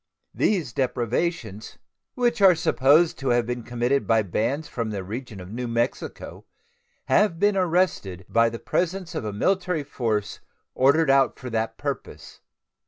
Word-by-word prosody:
These 170 Hz, -, 0 dB
depredations, 120 Hz, -, -2 dB, 0.4 s
which 240 Hz, -3 st, 0 dB
are 190 Hz, -2 st, +7 dB
supposed 160 Hz, +1 st, +3 dB
to 135 Hz, -, -4 dB
have 120 Hz, -1 st, +2 dB
been 120 Hz, +1 st, -3 dB
committed 120 Hz, +4 st, -1 dB
by 115 Hz, -1 st, +3 dB
bands 130 Hz, -, -2 dB
from 115 Hz, -2 st, -4 dB
the 100 Hz, -3 st, -4 dB
region 110 Hz, +1 st, -7 dB
of 90 Hz, +1 st, -10 dB
New 125 Hz, +2 st, -4 dB
Mexico, 115 Hz, +2 st, -3 dB, 0.6 s
have 205 Hz, -6 st, +2 dB
been 205 Hz, +3 st, +2 dB
arrested 170 Hz, -, 0 dB
by 115 Hz, 0 st, +3 dB
the 115 Hz, -, -6 dB
presence 180 Hz, +5 st, -2 dB
of -, -, -4 dB
a 105 Hz, -, -2 dB
military 180 Hz, -, 0 dB
force 110 Hz, -7 st, -2 dB, 0.3 s
ordered 140 Hz, +3 st, +4 dB
out 135 Hz, -2 st, +3 dB
for 125 Hz, -1 st, -8 dB
that 110 Hz, 0 st, -2 dB
purpose. -, -, -6 dB
125 Hz, 150 wpm, -24 LUFS, 115-165 Hz, 0.6 s, are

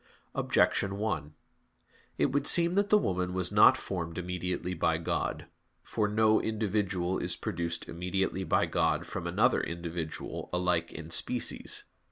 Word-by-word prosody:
Objection 100 Hz, 0 st, +1 dB
1: 100 Hz, -8 st, -2 dB, 0.8 s
It -, -, +2 dB
would 140 Hz, +1 st, 0 dB
seem 170 Hz, 0 st, +5 dB
that 200 Hz, +1 st, +2 dB
the 210 Hz, -, +6 dB
woman 90 Hz, -, -1 dB
was 90 Hz, -1 st, +1 dB
not -, -, +7 dB
formed 85 Hz, -3 st, -4 dB
immediately 90 Hz, 0 st, -3 dB
by 85 Hz, -2 st, +1 dB
God. 80 Hz, -, -2 dB, 0.4 s
For 105 Hz, -2 st, -1 dB
no 110 Hz, +1 st, +3 dB
individual 100 Hz, -4 st, -1 dB
is -, -, -2 dB
produced 85 Hz, 0 st, -3 dB
immediately 95 Hz, +2 st, -2 dB
by -, -, +2 dB
God -, -, 0 dB
from -, -, -5 dB
another -, -, +3 dB
individual 85 Hz, -1 st, -5 dB
alike 90 Hz, -2 st, 0 dB
in 80 Hz, +1 st, -8 dB
species. 85 Hz, -, -1 dB
90 Hz, 140 wpm, -30 LUFS, 85-105 Hz, 0.8 s, not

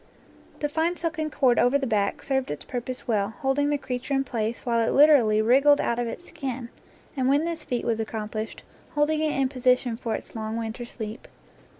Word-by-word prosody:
The 295 Hz, -, +1 dB
fine 325 Hz, +4 st, 0 dB
silken 325 Hz, -2 st, -2 dB
cord 255 Hz, -5 st, +3 dB
over 245 Hz, +3 st, +4 dB
the 280 Hz, -, -2 dB
back 210 Hz, -4 st, 0 dB
served 265 Hz, -1 st, 0 dB
its 150 Hz, -, -5 dB
pur 245 Hz, -, -3 dB
pose 255 Hz, +2 st, -7 dB
well, 205 Hz, -4 st, +1 dB
holding 275 Hz, +3 st, 0 dB
the 295 Hz, -, +1 dB
creature 260 Hz, 0 st, -3 dB
in 270 Hz, -, +2 dB
place 230 Hz, -3 st, -3 dB
while 235 Hz, -2 st, +2 dB
it 230 Hz, -, +1 dB
lit 295 Hz, +2 st, +7 dB
erally 220 Hz, -6 st, +4 dB
wriggled 280 Hz, +5 st, +5 dB
out 235 Hz, -, 0 dB
of 240 Hz, -, -1 dB
its 345 Hz, +9 st, -7 dB
skin, 260 Hz, -4 st, -5 dB, 0.5 s
and 260 Hz, -2 st, +1 dB
when 285 Hz, +4 st, +3 dB
this 335 Hz, -2 st, -4 dB
feat 245 Hz, -1 st, -3 dB
was 225 Hz, -1 st, 0 dB
accomplished, 220 Hz, 0 st, -4 dB, 0.3 s
holding 300 Hz, +1 st, +2 dB
it 310 Hz, -1 st, +1 dB
hi 270 Hz, -, +3 dB
position 250 Hz, -2 st, +1 dB
for 230 Hz, -2 st, -2 dB
its -, -, -9 dB
long 220 Hz, 0 st, -3 dB
winter 230 Hz, +1 st, -4 dB
sleep. 220 Hz, -1 st, -7 dB
255 Hz, 210 wpm, -26 LUFS, 230-285 Hz, 0.5 s, lit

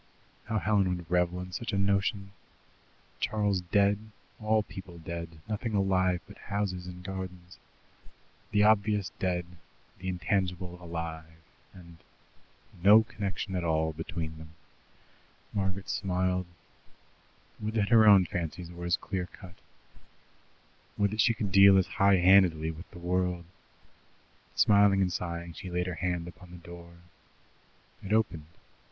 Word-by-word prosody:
How 110 Hz, 0 st, -1 dB
Helen 100 Hz, -4 st, +1 dB
would 85 Hz, -1 st, -11 dB
revel 90 Hz, 0 st, +1 dB
in 90 Hz, 0 st, -8 dB
such 115 Hz, +7 st, -4 dB
a -, -, +1 dB
notion! 100 Hz, 0 st, 0 dB, 0.9 s
Charles 105 Hz, -3 st, 0 dB
dead, 100 Hz, +3 st, +2 dB, 0.4 s
all 110 Hz, 0 st, +2 dB
people 95 Hz, -4 st, -10 dB
dead, 85 Hz, 0 st, -7 dB
nothing 110 Hz, +1 st, -3 dB
alive 95 Hz, -2 st, +2 dB
but -, -, -14 dB
houses 100 Hz, -3 st, -3 dB
and 90 Hz, 0 st, -9 dB
gardens. 90 Hz, -2 st, -7 dB, 0.9 s
The 105 Hz, 0 st, +3 dB
obvious 105 Hz, -2 st, +3 dB
dead, 90 Hz, -2 st, -1 dB, 0.5 s
the 95 Hz, -, -7 dB
intangible 90 Hz, -1 st, -2 dB
alive, 80 Hz, -1 st, -7 dB, 0.3 s
and 85 Hz, -2 st, -14 dB, 0.8 s
no 105 Hz, +4 st, +8 dB
connection 100 Hz, -2 st, -4 dB
at 90 Hz, -, -1 dB
all 80 Hz, -1 st, 0 dB
between 80 Hz, -1 st, -5 dB
them! 80 Hz, 0 st, -13 dB, 1.0 s
Margaret 95 Hz, -1 st, -2 dB
smiled. 90 Hz, -1 st, -1 dB, 1.1 s
Would 110 Hz, +1 st, -4 dB
that 100 Hz, -2 st, +1 dB
her 110 Hz, -2 st, +6 dB
own 100 Hz, -3 st, +8 dB
fancies 85 Hz, +1 st, -5 dB
were 85 Hz, 0 st, -7 dB
as 85 Hz, 0 st, +2 dB
clear 95 Hz, -3 st, -4 dB
cut! 95 Hz, -2 st, -13 dB, 1.4 s
Would 100 Hz, -1 st, +2 dB
that 110 Hz, 0 st, +1 dB
she 115 Hz, +3 st, +3 dB
could 105 Hz, -3 st, -3 dB
deal 100 Hz, +1 st, +8 dB
as 95 Hz, -, +3 dB
high 100 Hz, +2 st, +3 dB
handedly 90 Hz, -4 st, +5 dB
with 80 Hz, +3 st, -11 dB
the -, -, -13 dB
world! 90 Hz, 0 st, -1 dB, 1.1 s
Smiling 100 Hz, -1 st, +5 dB
and 90 Hz, -1 st, -1 dB
sighing, 85 Hz, 0 st, -4 dB
she 95 Hz, -, -8 dB
laid 90 Hz, 0 st, -1 dB
her 90 Hz, -, -3 dB
hand 85 Hz, +1 st, -2 dB
upon 90 Hz, 0 st, -12 dB
the 90 Hz, -, -11 dB
door. 85 Hz, 0 st, -12 dB, 1.1 s
It 100 Hz, -, -7 dB
opened. 90 Hz, -9 st, +1 dB
90 Hz, 135 wpm, -29 LUFS, 85-100 Hz, 1.4 s, no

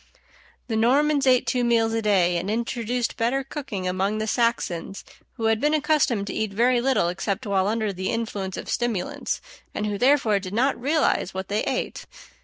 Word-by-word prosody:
The 225 Hz, -, -2 dB
Normans 275 Hz, +5 st, +3 dB
ate 255 Hz, -1 st, +4 dB
two 250 Hz, -2 st, 0 dB
meals 230 Hz, -1 st, +2 dB
a 225 Hz, -, 0 dB
day, 185 Hz, -5 st, +2 dB
and 180 Hz, +4 st, -3 dB
introduced 235 Hz, +1 st, -2 dB
better 250 Hz, +4 st, 0 dB
cooking 260 Hz, -9 st, -5 dB
among 190 Hz, +3 st, 0 dB
the 215 Hz, -, -1 dB
Saxons, 215 Hz, -6 st, -1 dB, 0.3 s
who 225 Hz, -, -4 dB
had 225 Hz, 0 st, +2 dB
been 300 Hz, +1 st, +3 dB
accustomed 295 Hz, -9 st, +1 dB
to -, -, -5 dB
eat 215 Hz, -2 st, -2 dB
very 240 Hz, +3 st, +3 dB
little 260 Hz, -8 st, +2 dB
except 195 Hz, +6 st, -3 dB
while 195 Hz, -2 st, +1 dB
under 215 Hz, -1 st, -1 dB
the 190 Hz, 0 st, -3 dB
influence 205 Hz, -5 st, -3 dB
of -, -, -6 dB
stimulants, 230 Hz, -7 st, -2 dB, 0.3 s
and 210 Hz, -, -2 dB
who 205 Hz, -1 st, -2 dB
therefore 250 Hz, -6 st, +3 dB
did 190 Hz, +1 st, -6 dB
not 260 Hz, +4 st, +2 dB
realize 285 Hz, -, +1 dB
what 190 Hz, 0 st, -4 dB
they 205 Hz, +1 st, 0 dB
ate. -, -, -3 dB
225 Hz, 185 wpm, -24 LUFS, 200-250 Hz, 0.3 s, ate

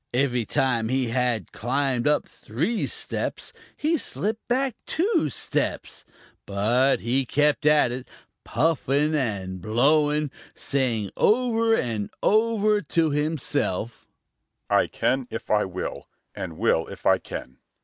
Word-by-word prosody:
Every 125 Hz, -3 st, +1 dB
time 115 Hz, -3 st, +1 dB
he 130 Hz, -1 st, 0 dB
had 120 Hz, -5 st, 0 dB
climbed 130 Hz, +1 st, 0 dB
up 150 Hz, 0 st, +2 dB
three 165 Hz, -, -2 dB
steps -, -, -3 dB, 0.2 s
he 315 Hz, +1 st, +1 dB
slipped 220 Hz, -1 st, -3 dB
back 260 Hz, 0 st, 0 dB
two 350 Hz, -, +1 dB
steps, -, -, -2 dB, 0.4 s
but 115 Hz, +7 st, +2 dB
he 125 Hz, +4 st, +1 dB
kept 150 Hz, +3 st, +1 dB
at 150 Hz, -5 st, +5 dB
it, 125 Hz, +1 st, -6 dB, 0.4 s
puffing 150 Hz, +2 st, +1 dB
and 100 Hz, -, -2 dB
blowing, 145 Hz, -, +2 dB, 0.2 s
saying 120 Hz, -7 st, -1 dB
over 230 Hz, -1 st, +3 dB
and 110 Hz, -, -2 dB
over 215 Hz, -1 st, +3 dB
to 160 Hz, -1 st, +1 dB
himself: 145 Hz, -, -1 dB, 0.6 s
"I -, -, +4 dB
can 130 Hz, -1 st, 0 dB
if 115 Hz, -, -6 dB
I 105 Hz, -1 st, +3 dB
will, 95 Hz, -1 st, -5 dB, 0.3 s
and 85 Hz, -4 st, -6 dB
will 80 Hz, -, +2 dB
if -, -, -11 dB
I -, -, +5 dB
can! 65 Hz, -, -8 dB
135 Hz, 125 wpm, -25 LUFS, 115-160 Hz, 0.6 s, at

